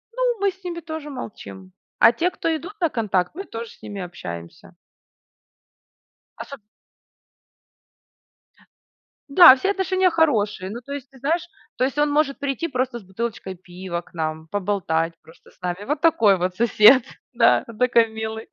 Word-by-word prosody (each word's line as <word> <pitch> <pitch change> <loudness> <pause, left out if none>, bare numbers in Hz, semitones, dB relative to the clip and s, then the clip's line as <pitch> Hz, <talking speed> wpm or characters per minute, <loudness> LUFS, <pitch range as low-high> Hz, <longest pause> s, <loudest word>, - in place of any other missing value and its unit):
но - - -4 0.2
мы 400 -1 +2
с 375 +1 -24
ними 345 -1 -5
тоже 315 -2 -7
молчим. 190 -7 -9 0.3
А - - +7
те, 345 +9 -1
кто 330 -2 -2
идут 350 +7 -7
на 335 - +2
контакт, 205 - -1
мы 385 - -5
тоже 230 0 -7
с - - -20
ними 200 -2 -7
общаемся. 85 - -9 1.6
Особ 280 -3 -8 2.7
Да, 280 -3 +9
все 390 +8 0
отношения 375 -1 +1
хорошие. 215 - +1
Ну, 230 +4 -6
то 280 +3 -8
есть, 275 -2 -7
ты 265 - -18
знаешь, 320 +6 -1 0.3
то - - -1
есть 270 +2 -1
он 295 0 +2
может 290 -1 +1
прийти 280 +4 -3
просто 255 -2 -2
с - - -17
бутылочкой 190 -1 -5
пива 180 0 -7
к - - -24
нам, 160 -1 -4
поболтать 175 -4 -1
просто 160 +2 -19
с - - -29
нами. 180 +2 -4
Вот 290 +4 -2
такой 265 - +4
вот 180 +1 -2
сосед, 235 +3 +6 0.3
да, 230 -1 +4
такой 235 -2 +4
милый. 220 0 -6
235 Hz, 160 wpm, -22 LUFS, 190-300 Hz, 2.7 s, Да